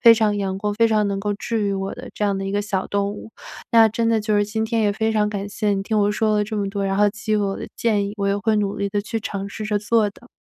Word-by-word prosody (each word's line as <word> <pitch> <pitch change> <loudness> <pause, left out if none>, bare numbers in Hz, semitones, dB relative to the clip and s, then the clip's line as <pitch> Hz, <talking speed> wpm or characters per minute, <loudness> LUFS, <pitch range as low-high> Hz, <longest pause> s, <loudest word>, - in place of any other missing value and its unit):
非 230 - +9
常 215 -2 +1
阳 195 -2 -2
光、 210 +1 -1
非 230 +2 +4
常 215 -2 +2
能 200 0 -1
够 205 +1 -1
治 220 +2 -2
愈 200 -1 0
我 195 0 -3
的 - - -9
这 210 - -1
样 200 -1 +1
的 195 - -3
一 195 - -3
个 205 - +1
小 195 -2 -2
动 200 0 0
物。 215 - -10 0.4
那 225 -1 +7
真 230 +2 0
的 225 -1 +2
就 210 0 +1
是 205 - +3
今 220 +2 -2
天 225 0 0
也 205 -1 +2
非 220 +2 0
常 210 -1 +2
感 200 -1 -4
谢 205 0 -1
你 195 - -2
听 215 +2 0
我 205 0 +3
说 215 0 +1
了 210 - +2
这 215 +1 -5
么 200 -1 -1
多， 200 0 -2
然 195 0 0
后 205 +1 +5
给 215 +1 -4
予 - - +3
我 200 -2 0
的 - - -6
建 210 -3 +1
议， 200 - -5
我 200 -1 -1
也 200 - +1
会 215 +2 +1
努 200 -1 0
力 200 - -1
地 205 +1 -1
去 225 +3 -3
尝 200 -2 -4
试 215 +2 -6
着 210 -1 0
做 215 0 +2
的。 235 +4 -19
210 Hz, 345 characters per minute, -22 LUFS, 200-220 Hz, 0.4 s, 非